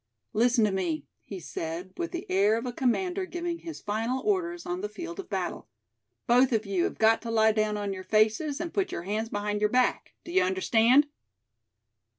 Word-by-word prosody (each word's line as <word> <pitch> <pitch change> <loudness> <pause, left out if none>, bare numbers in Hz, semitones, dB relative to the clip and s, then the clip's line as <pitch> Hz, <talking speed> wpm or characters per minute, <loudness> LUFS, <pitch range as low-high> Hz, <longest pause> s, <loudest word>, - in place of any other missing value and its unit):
"Listen 240 +1 +3
to 210 - +1
me," 180 -5 -2 0.2
he 195 - -7
said, 170 +2 -5
with 345 -1 -3
the 345 - -5
air 200 +4 +3
of 230 - -4
a 245 - -3
commander 360 - 0
giving 345 -1 -4
his 330 -1 -8
final 225 +5 -1
orders 350 -4 0
on 355 +1 -3
the 415 - -3
field 345 -3 -7
of 390 - -7
battle; - - -3 0.6
"Both 250 +2 +4
of 220 -2 +1
you 195 -3 0
have - - -3
got 225 +1 +4
to 230 - -6
lie 220 -1 +4
down 215 -1 0
on 205 -1 -2
your 185 -1 -7
faces, 220 +9 +2
and 340 0 -4
put 390 -2 0
your 170 - -4
hands 215 +4 -2
behind 205 0 -2
your 210 - +3
back; 250 +2 +1
do 340 - -8
you 375 +1 +4
understand?" 290 -8 +4
230 Hz, 200 wpm, -28 LUFS, 210-340 Hz, 0.6 s, Both